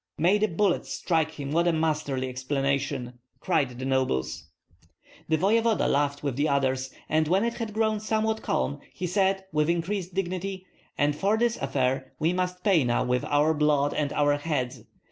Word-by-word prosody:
"May 185 +6 +3
the 215 - +3
bullets 185 0 0
strike 160 -3 0
him, 140 -1 -6
what 170 +3 +2
a - - +4
masterly 155 -5 -1
explanation!" 135 -1 -2 0.2
cried 145 -9 0
the 130 - -5
nobles. 130 - -1 0.8
The 160 - +3
voevoda 225 +5 +2
laughed 145 0 0
with 140 -3 -2
the 150 +2 +1
others, 130 -1 0 0.2
and 155 0 +2
when 190 +6 +2
it 235 - -1
had 230 -2 -4
grown 220 0 +1
somewhat 220 +1 0
calm 140 0 -1
he 185 - -5
said, 190 +1 +1
with 150 +1 +2
increased 175 +2 -2
dignity: 185 0 -3 0.3
"And 145 0 +2
for 200 +7 +1
this 235 0 +2
affair 135 -1 -1
we 160 +3 +1
must 180 0 -2
pay 190 -8 +4
now 120 -1 +1
with 125 0 0
our 150 +2 +3
blood 150 -2 +2
and 145 -2 -1
our 145 0 +2
heads. 130 -6 -3
155 Hz, 175 wpm, -27 LUFS, 140-190 Hz, 0.8 s, a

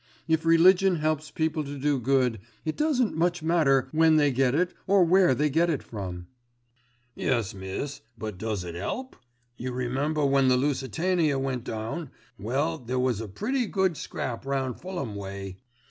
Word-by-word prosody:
If 160 0 +1
religion 180 +3 +6
helps 155 -1 -1
people 160 0 -1
to 145 0 -6
do 140 0 +1
good, 125 -2 +1 0.3
it 155 - -1
doesn't 280 -7 +1
much 175 0 0
matter 150 -6 +3
when 160 0 +4
they 145 -2 +4
get 130 0 +2
it, 180 +3 +1
or 195 -1 +5
where 175 -5 +4
they 150 +5 +2
get 165 +4 +2
it 150 -5 -1
from." 90 -5 -6 0.9
"Yes, 115 -6 -1
miss, 95 +9 -5 0.2
but 110 -4 -6
does 110 -3 -2
it 85 -1 -6
'elp? 255 - -4 0.4
You 125 +1 -4
remember 135 +5 -1
when 135 -1 +3
the 125 0 +4
Lusitania 150 +3 0
went 135 -3 -2
down, 115 +8 -4 0.3
well 140 - -1
there 125 0 -3
was 125 -4 +1
a 110 - -5
pretty 240 - -1
good 190 -4 +1
scrap 120 -4 -5
round 135 -2 -2
Fulham 175 - -4
way. 95 -1 -6
140 Hz, 165 wpm, -27 LUFS, 125-165 Hz, 0.9 s, religion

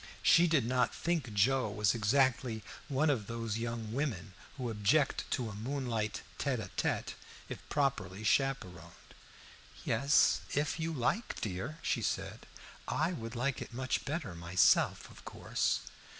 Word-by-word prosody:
She 175 +1 +6
did 155 -7 +2
not 125 0 +1
think 165 -9 -1
Joe 110 +4 +2
was 105 -1 +2
exactly 120 0 +1 0.2
one 145 +2 +2
of 110 -8 -2
those 115 -1 -3
young 115 -2 -4
women 115 - -2 0.2
who 125 -3 -3
object 120 +8 +1
to 125 - -1
a 110 - -6
moonlight 115 -2 -2 0.2
tête - - 0
à - - -6
tête, - - -1 0.4
if - - -5
properly 110 -9 -1
chaperoned. 95 - -1 0.7
"Yes, 140 +6 +4
if 145 +3 0
you 165 +1 -1
like, 155 - -1
dear," 105 - -4
she - - 0
said. - - -3 0.4
"I 160 +4 0
would 115 -6 -6
like 130 +3 -1
it - - -8
much 130 +1 -1
better 145 - -3
myself, 85 +2 +3
of - - -15
course." - - -1
120 Hz, 145 wpm, -33 LUFS, 105-140 Hz, 0.7 s, She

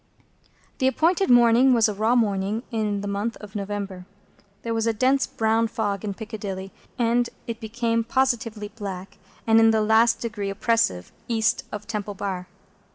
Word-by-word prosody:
The 260 - +3
appointed 340 +8 +2
morning 245 +1 +6
was 230 -2 +4
a 210 - -2
raw 220 +4 +1
morning 210 -1 0
in 210 -3 -1
the 205 - -5
month 205 +3 -2
of 205 -2 -12
November. 200 -2 -5 0.6
There 230 - -2
was 225 0 0
a 230 - +2
dense 260 +4 +2
brown 225 +1 +1
fog 205 -4 -2
in 200 -2 -3
Piccadilly, 200 -4 -6 0.3
and 240 0 +2 0.2
it 230 -1 -5
became 230 0 -1
positively 230 -4 -1
black 195 -3 -8 0.3
and 225 0 +5
in 225 0 +6
the 220 -1 +3
last 225 +2 +4
degree 215 -4 -4
oppressive 195 - 0 0.2
East 230 0 +1
of 210 0 -6
Temple 210 -2 -4
Bar. 190 -2 -4
220 Hz, 160 wpm, -24 LUFS, 205-230 Hz, 0.6 s, morning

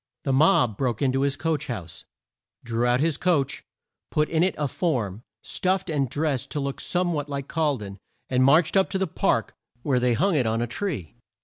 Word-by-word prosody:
The 135 - 0
mob 130 -6 +4
broke 125 -2 -1
in 130 - +3
to 135 +1 0
his 140 0 +1
coach 155 0 -1
house, 85 -9 -7 0.6
drew 120 +1 0
out 125 +2 +2
his 160 -2 +1
coach, 165 -7 +1 0.5
put 150 0 +1
in 160 -1 +1
it 185 +2 +2
a 150 - 0
form 120 - -2 0.2
stuffed 185 -1 -1
and 140 -4 0
dressed 145 -2 -1
to 150 - -1
look 140 -1 -3
some 175 -1 0
what 145 -2 -3
like 140 -1 -4
Col 155 -4 0
den 100 -2 -8 0.3
and 130 0 +2
marched 155 +7 +4
up 190 -1 +4
to 195 - -1
the 190 - +1
Park 165 - 0 0.3
where 135 -4 +2
they 125 -1 +2
hung 190 - +2
it 130 -7 +2
on 110 +1 0
a 120 - 0
tree. 120 - -4
140 Hz, 210 wpm, -25 LUFS, 120-160 Hz, 0.6 s, mob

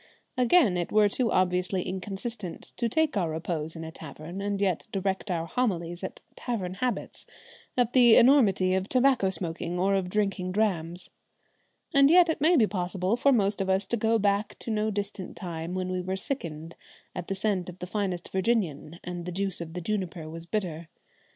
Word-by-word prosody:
Again, 250 - +4
it 175 - -2
were 210 -1 +5
too 230 +3 0
obviously 180 0 +1
inconsistent 195 +1 -6
to 235 -1 0
take 315 +3 +1
our 180 -5 +1
repose 160 0 -3
in 165 - -6
a 160 - -7
tavern 160 +4 -8
and 200 0 -2
yet 190 -2 0
direct 195 +1 -2
our 165 -2 -1
homilies 175 -5 -2
at 190 - -6
tavern 195 -7 -3
habits, 245 +6 -3 0.5
at 245 -1 +2
the 240 -3 +7
enormity 205 -8 +5
of 190 +1 -1
tobacco 255 -6 +3
smoking 175 -1 -1
or 190 +2 +2
of 190 -2 0
drinking 195 -2 -1
drams. 180 -5 -1 0.8
And 275 0 +6
yet 345 +1 +6
it 320 -2 -1
may 330 +4 +5
be 230 - +6
possible 185 +1 -1
for 275 +3 +3
most 205 -5 +2
of 190 - -1
us 190 +1 +2
to 235 - -1
go 225 0 +2
back 200 0 0
to 230 - -4
no 215 0 0
distant 205 -2 -5
time 170 -1 -5
when 185 0 -2
we 185 +1 -2
sickened 165 - -5 0.4
at 175 - -5
the 195 - -2
scent 190 -3 -1
of 180 - -10
the 180 - -6
finest 185 -2 -3
Virginian 185 -6 -1
and 175 -1 -5
the - - -3
juice 190 0 -2
of 165 -1 -7
the 180 - -4
juniper 180 -4 -3
was 165 +1 -8
bitter. 170 -6 -3
190 Hz, 185 wpm, -27 LUFS, 175-215 Hz, 0.8 s, the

